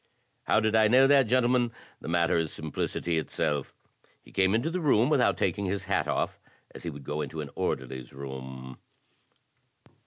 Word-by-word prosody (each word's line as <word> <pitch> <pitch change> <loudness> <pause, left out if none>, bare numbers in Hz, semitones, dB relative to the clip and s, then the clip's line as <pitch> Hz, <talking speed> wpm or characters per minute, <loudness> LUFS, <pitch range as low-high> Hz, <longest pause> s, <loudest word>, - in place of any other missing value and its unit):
"How - - +3
did 110 0 +1
I 110 -1 +5
know 130 +4 +6
that, 135 -3 +5
gentlemen? 125 0 +2 0.3
The - - -10
matter 85 0 +2
is 80 -2 0
simplicity 80 +2 -2
itself. 75 -2 -2 0.5
He - - -17
came 95 +2 +2
into 130 +9 0
the 185 - -1
room 135 -3 +3
without - - +3
taking 100 - 0
his 95 0 -2
hat 95 0 0
off, - - -1 0.3
as - - -10
he 85 - -4
would 70 -3 -9
go 75 +3 -3
into 80 - -5
an 75 -2 -5
orderly's 65 -1 -3
room. 65 -1 -8
85 Hz, 175 wpm, -28 LUFS, 70-115 Hz, 0.5 s, know